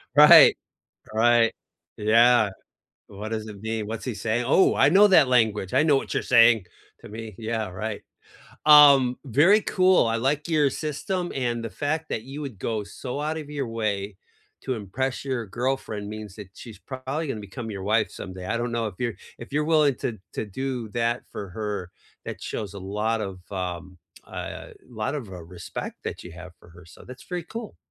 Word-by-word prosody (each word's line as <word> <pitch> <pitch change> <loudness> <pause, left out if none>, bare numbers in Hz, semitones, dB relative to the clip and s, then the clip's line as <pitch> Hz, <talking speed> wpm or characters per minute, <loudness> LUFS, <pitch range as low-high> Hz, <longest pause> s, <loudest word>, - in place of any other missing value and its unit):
Right, 150 +1 +9 0.6
right. 115 +1 +4 0.4
Yeah. 115 0 +4 0.6
"What 105 +2 -7
does 110 -1 -3
it 100 -2 -10
mean? 110 -1 -3
What's 110 0 -5
he 120 - -2
saying? 115 +3 -1
Oh, 190 - +4
I 135 - +4
know 200 +6 +7
that 160 -8 +6
language. 110 -6 +2
I - - +5
know 150 -3 +4
what - - -3
you're - - 0
saying 115 -4 +5 0.4
to - - -12
me." 110 -2 -8
Yeah, 110 -2 -3
right. 105 +3 -5 0.6
Um, 140 -4 +8
very 155 - +4
cool, 185 - +3
I 115 0 0
like 140 +6 0
your 150 -3 +3
system, 175 +6 -3
and 120 -3 -2
the 115 - -5
fact 155 +2 -2
that 110 - -2
you 135 +4 -8
would 125 -9 -7
go 110 -1 -2
so 125 +7 -6
out 155 +2 -2
of 150 -2 -8
your 140 -3 -3
way 105 -3 -3 0.5
to 130 - -2
impress 125 +7 -3
your 125 -5 -3
girlfriend 115 -3 -3
means 105 -2 -8
that 105 -3 -9
she's 115 -4 -11
probably 135 +4 -5
gonna 110 -5 -4
become 110 +3 -7
your 95 -2 -6
wife 110 +2 +1
someday. 95 -1 -8
I 115 - -1
don't 120 0 -3
know 115 -1 -1
if 95 - -11
you're 120 -2 -2 0.2
if 120 +3 -11
you're 150 0 +1
willing 155 -4 +3
to 110 -3 -4 0.2
to - - -2
do 125 +1 -4
that 120 +1 -1
for 100 - -6
her, 100 -2 -4 0.4
that - - -7
shows 100 -2 -5
a - - -6
lot 105 +4 -2
of, 95 -2 -6
um, 90 -1 -5 0.3
uh, - - -7 0.2
lot 110 +3 -3
of, 125 -9 -5
uh, 90 -2 -8
respect 85 +1 -7
that - - -5
you 90 - -10
have 90 +1 -11
for - - -18
her. 85 0 -16
So, - - -15
that's 125 +1 -11
very 180 -1 -4
cool. 225 +3 -8
115 Hz, 195 wpm, -25 LUFS, 105-135 Hz, 0.6 s, Right